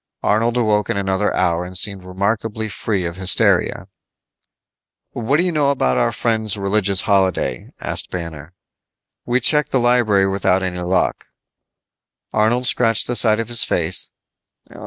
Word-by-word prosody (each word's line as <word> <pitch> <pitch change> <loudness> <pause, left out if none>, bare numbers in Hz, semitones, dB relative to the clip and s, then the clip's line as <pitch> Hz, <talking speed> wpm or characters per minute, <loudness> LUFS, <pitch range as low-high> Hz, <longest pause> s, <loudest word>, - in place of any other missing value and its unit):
Arnold 115 +3 +1
awoke 105 -4 +1
in - - -1
another 95 +1 0
hour 85 0 0
and 90 +1 -4
seemed 100 -1 +1
remarkably 105 +4 -2
free 100 -1 -2
of 85 +1 -5
hysteria. 95 -2 +1 1.2
"What 120 +5 0
do 170 - +2
you 180 - 0
know 150 -3 +1
about 65 - +1
our - - +1
friends' 110 -3 -1
religious 100 -1 0
holiday?" 95 -10 0
asked - - 0
Banner. 85 -2 -7 0.7
"We 125 +1 +2
checked 150 +4 +2
the 130 - +1
library 120 -5 +3
without 95 -1 +1
any 90 -1 -3
luck." 90 +1 -1 1.1
Arnold 115 +4 +1
scratched 115 -3 +2
the 120 - -3
side 110 -2 +2
of 115 - -3
his 120 -1 +2
face. 85 +2 -1
105 Hz, 145 wpm, -19 LUFS, 95-115 Hz, 1.2 s, library